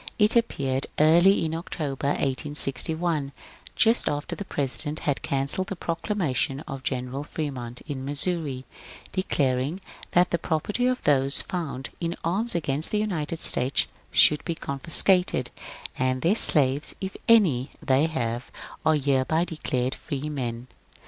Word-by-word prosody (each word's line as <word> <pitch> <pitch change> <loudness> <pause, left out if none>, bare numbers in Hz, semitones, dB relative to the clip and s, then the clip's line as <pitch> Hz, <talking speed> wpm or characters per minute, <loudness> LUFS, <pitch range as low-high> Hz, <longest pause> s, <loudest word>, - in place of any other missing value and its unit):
It 210 +1 +4
appeared 135 - 0
early 170 +5 +5
in 160 - -3
October, 150 -5 -4
1861, 145 +2 -1 0.4
just 230 +1 +3
after 145 0 -3
the 200 - -6
President 150 -1 -1
had 145 -2 -1
cancelled 140 +7 -1
the 195 - -4
proclamation 165 -6 -2
of 135 -4 -7
Greneral 130 +1 -3
Fremont 130 -6 -6
in 140 -4 -6
Missouri 145 -2 -1 0.5
declaring 145 -4 0 0.3
that 180 +1 +3
the 170 - 0
property 195 +10 -1
of 255 0 -1
those 140 -1 +4
found 155 -7 -5
in 170 0 -2
arms 210 +8 0
against 150 -2 0
the 210 - -1
United 170 -7 -2
States 130 -2 +2 0.2
should 150 -1 +5
be 170 - -3
confiscated, 160 0 +3
^^ - - -17 0.4
and 130 0 0
their 170 +4 +4
slaves, 145 - +2
if 190 0 -5
any 170 - +4
they 135 +3 +2
have, 120 -5 -3 0.3
are 155 - +3
hereby 140 +3 +1
declared 130 -6 -2
freemen.' 135 -5 -5
150 Hz, 135 wpm, -25 LUFS, 135-170 Hz, 0.5 s, early